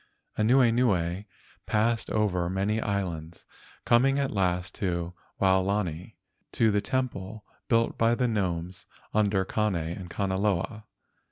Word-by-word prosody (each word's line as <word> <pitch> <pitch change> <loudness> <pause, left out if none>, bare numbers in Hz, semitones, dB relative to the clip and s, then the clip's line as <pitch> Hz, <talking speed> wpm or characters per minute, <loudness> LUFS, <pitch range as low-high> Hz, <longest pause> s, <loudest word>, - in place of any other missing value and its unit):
Anuenue 110 -6 +2 0.4
passed 115 +2 +1
over 90 -5 0
many 100 +4 0
islands, 85 -5 -3 0.4
coming 135 +4 +4
at 140 -1 0
last 90 -1 0
to 85 -3 -2 0.3
Waolani 95 -3 0 0.4
to 110 -2 +3
the 100 0 +1
temple 110 -4 -3 0.2
built 115 -1 +1
by 115 +1 +4
the 125 +1 +1
gnomes 90 -4 -2 0.3
under 100 -3 +2
Kane 105 0 0
and 85 +2 -4
Kanaloa. 95 +3 -1
100 Hz, 110 wpm, -27 LUFS, 90-110 Hz, 0.4 s, coming